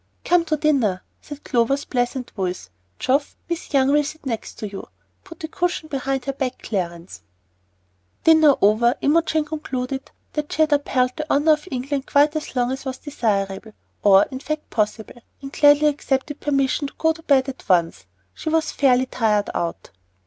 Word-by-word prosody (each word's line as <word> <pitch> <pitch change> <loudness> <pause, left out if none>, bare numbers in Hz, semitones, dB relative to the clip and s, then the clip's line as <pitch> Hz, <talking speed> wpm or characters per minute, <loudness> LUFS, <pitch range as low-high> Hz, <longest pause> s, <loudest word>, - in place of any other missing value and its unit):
"Come 350 -1 +3
to 310 -1 0
dinner," 265 - +1 0.2
said 290 -1 -10
Clover's 250 +4 +1
pleasant 245 0 -2
voice. 180 - -4 0.3
"Geoff, 275 +3 0
Miss 340 -1 -5
Young 270 -1 +3
will 295 +1 +4
sit 305 +1 -8
next 230 -4 -4
to 215 - -5
you. 195 -1 -8 0.4
Put 335 -4 -13
a - - -2
cushion 350 -1 -2
behind 270 -2 -2
her 275 - -2
back, 260 -2 -3
Clarence." 170 - -4 1.0
Dinner 315 -3 +6
over, 230 +5 +4
Imogen 315 +1 +2
concluded 270 -3 -4 0.2
that 300 -1 -3
she 315 - +3
had 305 -1 +1
upheld 255 -3 +1
the 305 -1 -4
honor 295 +3 +4
of 300 +3 -4
England 270 0 -3
quite 295 +2 +3
as 310 -3 -5
long 245 0 +1
as 265 - -4
was 260 -2 -4
desirable, 210 -6 -2 0.3
or 200 -1 +6
in 260 - -5
fact 305 +2 -5
possible, 220 +2 -2 0.2
and 275 +1 -9
gladly 290 0 +5
accepted 285 0 -2
permission 275 0 0
to - - -13
go 320 - +2
at 320 - -6
once 325 - -18
to 270 -2 +2
bed. 170 -3 +3 0.4
She - - -5
was 320 0 +1
fairly 255 -2 +3
tired 215 -5 0
out. 170 -1 -4
270 Hz, 175 wpm, -22 LUFS, 235-300 Hz, 1.0 s, Dinner